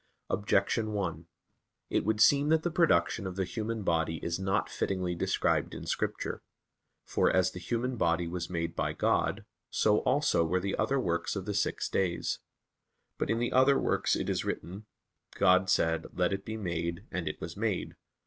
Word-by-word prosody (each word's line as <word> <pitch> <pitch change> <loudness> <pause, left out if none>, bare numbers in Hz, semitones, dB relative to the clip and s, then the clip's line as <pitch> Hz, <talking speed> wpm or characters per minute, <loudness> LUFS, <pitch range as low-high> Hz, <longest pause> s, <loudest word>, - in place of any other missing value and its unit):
Objection 105 +2 +1
1: 85 -5 -3 0.6
It - - +2
would 110 +1 0
seem 140 +6 +5
that 160 0 +3
the 175 - 0
production 100 - +2
of 90 - -6
the 95 - 0
human 110 +3 -3
body 80 -2 +1
is 85 +1 -2
not 95 +2 0
fittingly 90 -2 -2
described 85 - 0
in - - -7
Scripture. - - -2 0.6
For, - - +2
as 95 -1 +3
the 90 - -8
human 120 +6 -2
body 85 -2 +1
was 85 0 -4
made 85 -2 -3
by - - -1
God, - - 0 0.2
so 105 -1 +3
also 130 - +2
were 90 +3 +1
the 95 +1 -2
other 135 0 +1
works 85 -5 -1
of 95 -2 -4
the 105 - -2
six 100 - 0
days. 90 -3 -1 0.8
But - - -1
in 115 - +2
the 120 +1 -1
other 130 +2 +5
works - - +1
it - - -2
is - - 0
written, 100 +5 -5 0.5
"God 95 +1 +4
said; 80 -3 +2
Let 90 +1 +1
it 95 0 -4
be 110 0 -4
made, 85 -1 -3
and 90 -3 -3
it 75 - -4
was 80 +1 -6
made." 105 -2 -2
95 Hz, 180 wpm, -30 LUFS, 85-110 Hz, 0.8 s, seem